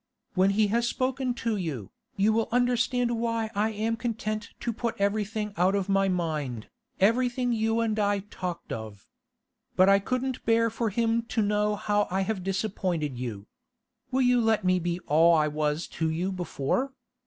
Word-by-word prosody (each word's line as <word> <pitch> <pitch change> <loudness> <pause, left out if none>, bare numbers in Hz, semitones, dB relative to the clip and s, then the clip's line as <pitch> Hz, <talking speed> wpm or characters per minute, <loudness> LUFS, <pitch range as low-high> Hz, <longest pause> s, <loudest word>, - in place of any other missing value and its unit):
When 190 0 +4
he 210 +2 +3
has 235 +3 +1
spoken 255 0 -1
to 225 -2 +1
you, 145 - -4 0.2
you 210 +2 +3
will 225 0 0
understand 245 -1 +1
why 230 -1 -1
I 210 +1 +1
am 220 +1 -1
content 215 -2 -3
to 235 - -1
put 235 +1 -2
everything 210 +1 -1
out 185 +3 +3
of 200 -1 -1
my 195 0 +3
mind, 155 -10 -2 0.3
everything 245 +4 +2
you 225 0 +1
and 220 -1 0
I 205 -1 +1
talked 180 -2 -5
of. 110 -3 -8 0.7
But 185 +1 +5
I 195 0 +6
couldn't 255 +4 -2
bear 230 0 +3
for 225 0 -1
him 230 +2 +1
to 225 - 0
know 210 0 +1
how 205 0 0
I 190 +1 0
have 195 0 -2
disappointed 185 - -2
you. 110 -5 -5 0.6
Will 260 0 +1
you 245 -1 +4
let 225 -2 +2
me 185 0 +3
be 175 0 -2
all 165 +3 +5
I 155 -1 +3
was 150 +1 -1
to 160 -1 -1
you 175 +4 -1
before? 180 - -2
210 Hz, 175 wpm, -27 LUFS, 180-230 Hz, 0.7 s, I